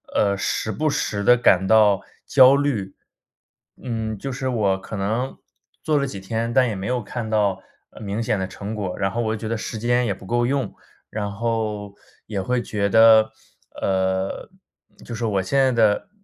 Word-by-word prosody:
呃， 100 Hz, -1 st, +2 dB
时 110 Hz, +2 st, -2 dB
不 155 Hz, +9 st, 0 dB
时 100 Hz, -7 st, -2 dB
地 125 Hz, +3 st, +6 dB
感 95 Hz, -5 st, +3 dB
到 105 Hz, -3 st, +5 dB, 0.2 s
焦 130 Hz, 0 st, +7 dB
虑。 135 Hz, -9 st, -1 dB, 0.9 s
嗯， 110 Hz, -3 st, -3 dB
就 135 Hz, +7 st, -5 dB
是 130 Hz, +1 st, -4 dB
我 100 Hz, -5 st, +1 dB
可 105 Hz, -, -8 dB
能 110 Hz, +7 st, -2 dB, 0.4 s
做 155 Hz, -1 st, +1 dB
了 140 Hz, -, +1 dB
几 100 Hz, -8 st, -6 dB
天， 115 Hz, +4 st, -3 dB
但 130 Hz, -1 st, +4 dB
也 110 Hz, -, -2 dB
没 95 Hz, +1 st, -5 dB
有 125 Hz, -1 st, -1 dB
看 115 Hz, +2 st, -5 dB
到 105 Hz, -3 st, +1 dB, 0.4 s
明 105 Hz, +2 st, -3 dB
显 110 Hz, -2 st, 0 dB
的 95 Hz, -, -2 dB
成 100 Hz, +3 st, -6 dB
果， 95 Hz, -4 st, -3 dB
然 95 Hz, -1 st, +1 dB
后 120 Hz, +4 st, -2 dB
我 110 Hz, -1 st, -1 dB
觉 110 Hz, +1 st, -6 dB
得 115 Hz, 0 st, -1 dB
时 110 Hz, 0 st, -5 dB
间 120 Hz, +1 st, +1 dB
也 100 Hz, -, 0 dB
不 95 Hz, -, -13 dB
够 120 Hz, +4 st, +1 dB
用， 135 Hz, +1 st, -1 dB, 0.3 s
然 105 Hz, -1 st, -4 dB
后 105 Hz, -2 st, -3 dB, 0.3 s
也 105 Hz, -2 st, -3 dB
会 120 Hz, +6 st, 0 dB
觉 100 Hz, -3 st, -1 dB
得， 110 Hz, 0 st, +6 dB, 0.5 s
呃， 95 Hz, 0 st, -1 dB, 0.5 s
就 120 Hz, -, -7 dB
是 115 Hz, -, -3 dB
我 100 Hz, -3 st, +1 dB
现 115 Hz, +9 st, -1 dB
在 135 Hz, -1 st, +4 dB
的 110 Hz, -, +2 dB
110 Hz, 200 characters per minute, -22 LUFS, 100-120 Hz, 0.9 s, 焦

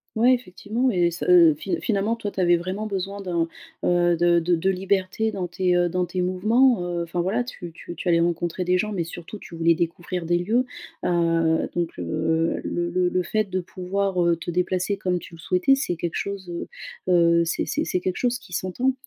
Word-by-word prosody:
Ouais 240 Hz, +3 st, +5 dB
effectivement 240 Hz, +3 st, -2 dB
et 175 Hz, -3 st, +2 dB
ce 170 Hz, -, -5 dB
heu, 170 Hz, -4 st, +7 dB
fi 190 Hz, +5 st, -2 dB
finalement 215 Hz, +1 st, 0 dB
toi 210 Hz, -3 st, -4 dB
tu 195 Hz, -, -7 dB
avais 175 Hz, -1 st, +5 dB
vraiment 185 Hz, +5 st, -3 dB
besoin 195 Hz, 0 st, -3 dB
d'un, 170 Hz, -4 st, -1 dB, 0.4 s
heu, 175 Hz, -1 st, +3 dB
de 175 Hz, +1 st, +3 dB
de 170 Hz, +1 st, +2 dB
de 180 Hz, +4 st, 0 dB
liberté 195 Hz, +3 st, 0 dB
dans 180 Hz, -3 st, -3 dB
tes, 180 Hz, +1 st, +1 dB
heu, 175 Hz, 0 st, +3 dB
dans 180 Hz, +1 st, 0 dB
tes 180 Hz, +2 st, -3 dB
mouvements, 215 Hz, +5 st, +3 dB
heu, 175 Hz, -1 st, -2 dB
enfin, 170 Hz, +1 st, -3 dB
voilà 210 Hz, +8 st, 0 dB
tu 175 Hz, -8 st, -8 dB
tu 170 Hz, +1 st, -9 dB
tu 170 Hz, -, -6 dB
allais 170 Hz, -1 st, +4 dB
rencontrer 175 Hz, +1 st, 0 dB
des 180 Hz, +1 st, +2 dB
gens, 215 Hz, +3 st, -1 dB
mais 175 Hz, -5 st, -2 dB
surtout 175 Hz, +5 st, -8 dB
tu 170 Hz, -, -11 dB
voulais 165 Hz, 0 st, +4 dB
découvrir 170 Hz, +1 st, -3 dB
des 175 Hz, +1 st, +3 dB
lieux, 225 Hz, +8 st, +1 dB, 0.4 s
heu, 165 Hz, -2 st, +2 dB
donc, 170 Hz, -1 st, -2 dB
heu, 160 Hz, -, 0 dB
le 175 Hz, 0 st, -2 dB
le 180 Hz, 0 st, +2 dB
le 180 Hz, 0 st, 0 dB
fait 215 Hz, +4 st, 0 dB
de 185 Hz, 0 st, -1 dB
pouvoir, 185 Hz, +1 st, -1 dB
heu, 170 Hz, -1 st, +3 dB
te 170 Hz, -, -5 dB
déplacer 185 Hz, +3 st, 0 dB
comme 180 Hz, -2 st, 0 dB
tu 175 Hz, -, -10 dB
le 165 Hz, -, -12 dB
souhaitais, 180 Hz, +10 st, +2 dB
c'est 270 Hz, -10 st, 0 dB
quelque 170 Hz, 0 st, -4 dB
chose, 200 Hz, -2 st, -4 dB
heu 170 Hz, 0 st, -5 dB, 0.4 s
heu, 170 Hz, -1 st, +5 dB
c'est 165 Hz, -, -1 dB
c'est 305 Hz, -, -1 dB
c'est 180 Hz, -, -1 dB
quelque 180 Hz, 0 st, -2 dB
chose 245 Hz, -1 st, 0 dB
qui 180 Hz, -, -15 dB
s'entend. 245 Hz, +10 st, 0 dB
180 Hz, 215 wpm, -24 LUFS, 170-195 Hz, 0.4 s, heu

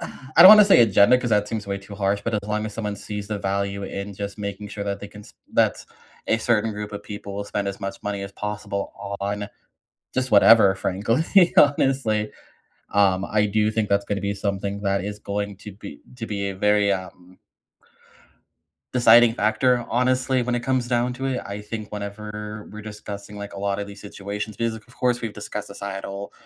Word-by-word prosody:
I 130 Hz, 0 st, -10 dB
don't 185 Hz, -, +12 dB
wanna 210 Hz, -1 st, +10 dB
say 195 Hz, -10 st, +6 dB
agenda 105 Hz, +3 st, +5 dB
'cause 120 Hz, -2 st, -3 dB
that 105 Hz, -1 st, +2 dB
seems 110 Hz, -2 st, -4 dB
way 100 Hz, 0 st, -3 dB
too 100 Hz, +1 st, -11 dB
harsh, 100 Hz, 0 st, 0 dB
but 115 Hz, -1 st, -2 dB
as 105 Hz, -, +1 dB
long 105 Hz, +1 st, -1 dB
as 105 Hz, -, -7 dB
someone 105 Hz, -2 st, -3 dB
sees 105 Hz, 0 st, -6 dB
the 105 Hz, -1 st, -2 dB
value 100 Hz, 0 st, -2 dB
in 100 Hz, +1 st, -5 dB
just 100 Hz, +1 st, -6 dB
making 100 Hz, 0 st, -5 dB
sure 100 Hz, -1 st, -5 dB
that 100 Hz, 0 st, -3 dB
they 100 Hz, -, -8 dB
can 105 Hz, 0 st, -12 dB
s -, -, -16 dB, 0.2 s
that -, -, +2 dB, 0.4 s
a 110 Hz, -, +2 dB
certain 110 Hz, -1 st, +1 dB
group 105 Hz, 0 st, -6 dB
of 100 Hz, -, -6 dB
people 100 Hz, -1 st, -8 dB
will 100 Hz, 0 st, -4 dB
spend 100 Hz, -1 st, -2 dB
as 100 Hz, -, -6 dB
much 100 Hz, 0 st, -6 dB
money 100 Hz, -1 st, -3 dB
as 100 Hz, 0 st, -7 dB
possible 105 Hz, -1 st, -4 dB, 0.3 s
on 105 Hz, +1 st, -3 dB, 0.6 s
just 130 Hz, 0 st, -1 dB
whatever, 100 Hz, -1 st, +7 dB
frankly, 115 Hz, -, +2 dB
honestly. 130 Hz, -7 st, +3 dB, 0.6 s
Um, 95 Hz, -2 st, +3 dB
I 105 Hz, 0 st, +1 dB
do 105 Hz, +1 st, +1 dB
think 110 Hz, -1 st, -1 dB
that's 100 Hz, 0 st, +2 dB
gonna 100 Hz, -1 st, -2 dB
be 100 Hz, 0 st, -2 dB
something 100 Hz, 0 st, -3 dB
that 100 Hz, -1 st, 0 dB
is 105 Hz, 0 st, -5 dB
going 100 Hz, -1 st, -4 dB
to 105 Hz, -, -10 dB
be 100 Hz, -, -11 dB, 0.2 s
to 115 Hz, -2 st, -5 dB
be 100 Hz, -2 st, -3 dB
a 95 Hz, -, -6 dB
very, 105 Hz, 0 st, +3 dB
um 90 Hz, -1 st, -7 dB, 1.6 s
deciding 120 Hz, -2 st, +6 dB
factor, 120 Hz, +3 st, +2 dB
honestly, 130 Hz, +1 st, +1 dB
when 120 Hz, 0 st, -1 dB
it 120 Hz, -, 0 dB
comes 125 Hz, 0 st, 0 dB
down 120 Hz, 0 st, 0 dB
to 130 Hz, +2 st, -4 dB
it. 130 Hz, -1 st, -1 dB
I 100 Hz, +1 st, -6 dB
think 105 Hz, 0 st, -7 dB
whenever 105 Hz, +1 st, -6 dB
we're 110 Hz, -, -9 dB
discussing, 105 Hz, -1 st, -8 dB
like, 100 Hz, 0 st, -7 dB
a 100 Hz, -, -8 dB
lot 100 Hz, 0 st, -1 dB
of 100 Hz, -, -4 dB
these 100 Hz, 0 st, -11 dB
situations, 105 Hz, +1 st, -6 dB
be 115 Hz, -, 0 dB
of 115 Hz, +2 st, -7 dB
course 125 Hz, -1 st, +1 dB
we've 115 Hz, -3 st, -4 dB
discussed 105 Hz, 0 st, -6 dB
societal 100 Hz, 0 st, -6 dB
105 Hz, 200 wpm, -23 LUFS, 100-110 Hz, 1.6 s, don't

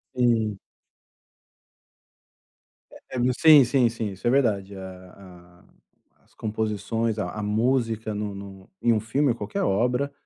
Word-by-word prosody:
Sim. 115 Hz, -5 st, +1 dB, 2.3 s
É -, -, -14 dB, 0.2 s
é 125 Hz, +1 st, +1 dB
sim, 155 Hz, 0 st, +7 dB
sim, 120 Hz, 0 st, +2 dB
sim, 115 Hz, -2 st, -4 dB
isso 95 Hz, +4 st, -5 dB
é -, -, +5 dB
verdade. 105 Hz, -7 st, +1 dB
A 95 Hz, -1 st, -10 dB
a 90 Hz, -2 st, -17 dB, 0.6 s
as -, -, -30 dB
composições, 110 Hz, +1 st, -2 dB
a 90 Hz, -, -2 dB
a 105 Hz, -, -5 dB
música 115 Hz, 0 st, 0 dB
no 105 Hz, -1 st, -4 dB
no 95 Hz, -1 st, -11 dB
em 120 Hz, -, +3 dB
um 110 Hz, -, +1 dB
filme 130 Hz, +7 st, 0 dB
ou 120 Hz, -, +1 dB
qualquer 105 Hz, -2 st, -4 dB
obra, 125 Hz, +8 st, 0 dB
110 Hz, 140 wpm, -25 LUFS, 100-120 Hz, 2.3 s, sim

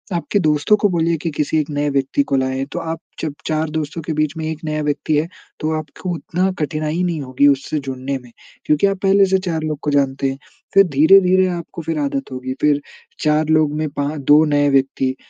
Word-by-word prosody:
आपके 175 Hz, +4 st, 0 dB
दोस्तों 155 Hz, +4 st, +3 dB
को 205 Hz, -, +4 dB
बोलिए 170 Hz, -2 st, +1 dB
की 170 Hz, -, 0 dB
किसी 150 Hz, +1 st, -1 dB
1 150 Hz, -, -2 dB
नए 145 Hz, 0 st, 0 dB
व्यक्ति 140 Hz, -, +1 dB
को -, -, +3 dB
लाएँ। 130 Hz, +1 st, -1 dB
तो -, -, -2 dB
आप 165 Hz, -1 st, -4 dB, 0.2 s
जब 155 Hz, -3 st, -3 dB
4 155 Hz, 0 st, 0 dB
दोस्तों 155 Hz, +1 st, -4 dB
के 160 Hz, -, -3 dB
बीच 155 Hz, -1 st, 0 dB
में 160 Hz, -, -3 dB
1 155 Hz, -, -6 dB
नया 155 Hz, 0 st, -2 dB
व्यक्ति 150 Hz, +1 st, 0 dB
है 155 Hz, +2 st, 0 dB, 0.3 s
तो 155 Hz, -, 0 dB
आपको 155 Hz, +4 st, -8 dB
उतना 180 Hz, +3 st, -1 dB
कठिनाई 155 Hz, +2 st, -2 dB
नहीं 170 Hz, -4 st, -1 dB
होगी 135 Hz, +1 st, +2 dB
उससे 140 Hz, +2 st, +1 dB
जुड़ने 135 Hz, +1 st, -3 dB
में। 120 Hz, -, -16 dB, 0.3 s
क्योंकि 150 Hz, +6 st, +3 dB
आप 195 Hz, -, -1 dB
पहले 195 Hz, 0 st, +5 dB
से 190 Hz, 0 st, +3 dB
4 160 Hz, -2 st, -1 dB
लोग 155 Hz, -2 st, -3 dB
को 150 Hz, -, 0 dB
जानते 135 Hz, -1 st, +1 dB
हैं। 135 Hz, -, -7 dB, 0.4 s
फिर 195 Hz, -, +7 dB
धीरे-धीरे 185 Hz, +5 st, +6 dB
आपको 170 Hz, -1 st, -5 dB
फिर 160 Hz, -1 st, -2 dB
आदत 140 Hz, -1 st, -2 dB
होगी, 130 Hz, 0 st, -4 dB
फिर 145 Hz, -1 st, +3 dB, 0.4 s
4 150 Hz, 0 st, +2 dB
लोग 155 Hz, -2 st, +3 dB
में 155 Hz, 0 st, -1 dB
पाँ 145 Hz, +2 st, -3 dB
2 145 Hz, +3 st, +5 dB
नए 145 Hz, -1 st, +2 dB
व्यक्ति, 135 Hz, -1 st, +1 dB
155 Hz, 215 wpm, -19 LUFS, 140-165 Hz, 0.4 s, फिर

